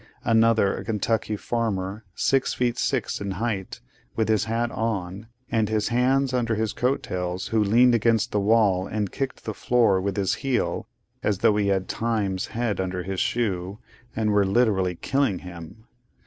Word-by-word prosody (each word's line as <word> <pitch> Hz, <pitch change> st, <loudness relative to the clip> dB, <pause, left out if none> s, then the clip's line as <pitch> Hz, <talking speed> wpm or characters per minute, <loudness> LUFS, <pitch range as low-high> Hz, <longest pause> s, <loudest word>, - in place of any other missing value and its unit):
Another, 115 Hz, -3 st, +3 dB
a -, -, -6 dB
Kentucky 110 Hz, 0 st, -1 dB
farmer, 105 Hz, -2 st, -2 dB
six 135 Hz, -1 st, +1 dB
feet 120 Hz, -1 st, 0 dB
six -, -, -1 dB
in 100 Hz, -1 st, -3 dB
height, 100 Hz, -1 st, -3 dB, 0.3 s
with 110 Hz, -1 st, 0 dB
his 110 Hz, -3 st, +2 dB
hat 115 Hz, +1 st, -1 dB
on, 100 Hz, -2 st, -3 dB, 0.2 s
and 110 Hz, -2 st, +1 dB
his 110 Hz, 0 st, 0 dB
hands 130 Hz, +2 st, +2 dB
under 115 Hz, -3 st, +1 dB
his 110 Hz, 0 st, -1 dB
coat 130 Hz, +3 st, 0 dB
tails, 90 Hz, 0 st, -3 dB
who 110 Hz, -1 st, +2 dB
leaned 120 Hz, +4 st, +5 dB
against 115 Hz, 0 st, +2 dB
the 105 Hz, -, +1 dB
wall 100 Hz, -3 st, +3 dB
and 105 Hz, -3 st, -2 dB
kicked 135 Hz, -1 st, -4 dB
the 110 Hz, -, -3 dB
floor 115 Hz, -5 st, +2 dB
with 100 Hz, 0 st, -2 dB
his 95 Hz, -2 st, +1 dB
heel, 135 Hz, -2 st, -1 dB, 0.3 s
as 105 Hz, -, 0 dB
though 105 Hz, -, +3 dB
he 105 Hz, -1 st, +1 dB
had 95 Hz, -1 st, 0 dB
Time's 105 Hz, -5 st, -1 dB
head 115 Hz, -3 st, -2 dB
under 90 Hz, -1 st, -2 dB
his 95 Hz, 0 st, -4 dB
shoe, 100 Hz, -5 st, -1 dB, 0.4 s
and 110 Hz, -1 st, +1 dB
were 105 Hz, -1 st, +4 dB
literally 95 Hz, -3 st, +2 dB
'killing' 135 Hz, 0 st, 0 dB
him. 85 Hz, +5 st, -10 dB
110 Hz, 170 wpm, -25 LUFS, 95-115 Hz, 0.4 s, leaned